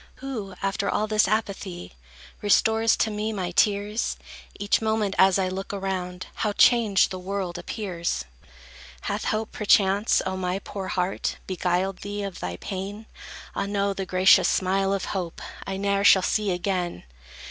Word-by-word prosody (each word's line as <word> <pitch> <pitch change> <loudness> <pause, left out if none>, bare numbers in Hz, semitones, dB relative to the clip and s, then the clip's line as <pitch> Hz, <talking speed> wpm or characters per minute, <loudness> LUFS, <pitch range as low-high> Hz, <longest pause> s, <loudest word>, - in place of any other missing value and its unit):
Who, 225 -8 -6
after 195 0 0
all 215 - +1
this 215 -1 +3
apathy, 195 - -3 0.5
Restores 220 +2 +3
to 220 - +1
me 210 +1 -2
my 185 -4 -3
tears? 205 +3 +1 0.4
Each 205 +2 +2
moment, 220 -2 0
as 190 0 +6
I 190 -1 +1
look 190 +1 -4
around, 185 -2 -3
How 210 -2 0
changed 220 -4 +4
the 185 - -4
world 185 -2 -3
appears! 175 - -3 0.8
Hath - - -3
hope, 215 0 -1
perchance, 205 0 +3
O 190 - -2
my 185 0 -1
poor 195 -1 -6
heart, 185 -1 -1
Beguiled 185 +1 -1
thee 205 0 -4
of 195 -3 -6
thy 90 0 -4
pain? 200 - -6 0.5
Ah, - - -1
no, 200 0 0
the 195 -1 -5
gracious 185 +1 +5
smile 195 +1 +1
of 195 -1 -1
hope 180 -4 -4 0.3
I 195 0 -3
ne'er 200 0 +1
shall 190 -2 +7
see 210 +1 +1
again. 180 - -2
195 Hz, 155 wpm, -25 LUFS, 185-210 Hz, 0.8 s, shall